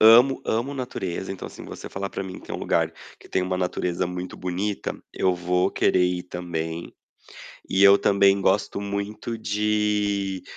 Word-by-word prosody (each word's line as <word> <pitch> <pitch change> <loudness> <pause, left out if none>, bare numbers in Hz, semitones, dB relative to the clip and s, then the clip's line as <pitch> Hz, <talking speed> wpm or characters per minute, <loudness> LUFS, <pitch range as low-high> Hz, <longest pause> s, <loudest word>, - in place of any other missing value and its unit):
Amo 120 +5 +7
amo 125 +6 0
natureza, 95 -8 -4
então, 95 - -7
assim, - - -10
você - - -8
falar 100 0 -4
pra - - -4
mim 95 -1 -7
que - - -16
tem - - -3
lugar - - +1 0.3
que - - -15
tem 95 - +1
uma 90 0 -1
natureza 90 0 -1
muito 90 0 -5
bonita, 95 +3 -2 0.2
eu 95 -1 +2
vou 90 +2 +1
querer 90 -1 +3
ir 90 0 0
também. 85 -2 -4 0.8
E 95 +1 +3
eu 100 0 +9
também 100 0 +4
gosto 100 +1 +1
muito 100 +3 -4
de, 105 -2 0
95 Hz, 165 wpm, -25 LUFS, 90-105 Hz, 0.8 s, eu